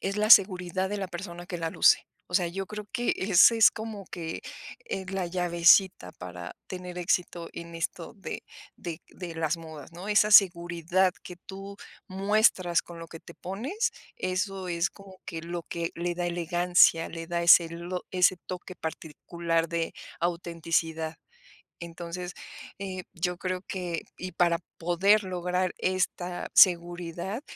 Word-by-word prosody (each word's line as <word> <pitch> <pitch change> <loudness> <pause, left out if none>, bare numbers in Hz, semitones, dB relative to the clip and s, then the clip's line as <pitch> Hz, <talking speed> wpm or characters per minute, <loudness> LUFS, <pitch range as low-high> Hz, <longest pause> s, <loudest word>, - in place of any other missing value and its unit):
Es 195 +1 -2
la 215 +1 +1
seguridad 185 -2 +5
de 205 +1 -3
la 190 - -3
persona 175 -1 -7
que 175 - -5
la 165 -1 -2
luce. - - +4 0.2
O 180 - -8
sea, 175 -2 +3
yo 190 +2 -5
creo 210 -1 -7
que 240 0 +1
ese 195 +4 +6
es 225 - +7
como, 220 -3 -7
que, 165 -2 -6 0.5
eh, 190 - -4
la 190 -2 -2
llavecita 175 - +4
para 90 -1 -9
tener 180 -1 -7
éxito 175 -1 -1
en 170 0 -8
esto 165 +2 -4
de 190 - -6 0.3
de 165 -3 -6
de 175 -3 -8
las 160 0 0
modas, 160 -2 -11
¿no? 180 +4 -8
Esa 210 0 +4
seguridad 175 -1 +4
que 180 - -9
tú 195 +2 -10 0.3
muestras 195 -3 +2
con 170 -1 -11
lo 165 - -8
que 165 0 -11
te 170 - -13
pones, 270 - -3 0.2
eso 185 +1 -2
es 170 +2 0
como 195 -2 -15
que 165 - -5
lo 170 +1 -5
que 170 0 -4
le 175 +1 -3
da 175 - -1
elegancia, 175 -1 +3
le 165 0 -7
da 170 -1 -1
ese 170 -1 +7 0.4
ese 185 0 +4
toque 185 0 -7
particular 165 +1 -3
de 165 -1 -2 0.2
autenticidad. 165 -2 -1 0.6
Entonces, 170 +1 -6 0.5
eh, 190 -2 -5
yo 180 +1 -1
creo 185 +1 -3
que 180 -4 -4 0.2
y 185 0 -6
para 170 0 +2 0.2
poder 190 +5 +3
lograr 180 0 -1
esta 180 -1 -2
seguridad, 175 - +3
175 Hz, 150 wpm, -28 LUFS, 170-190 Hz, 0.6 s, es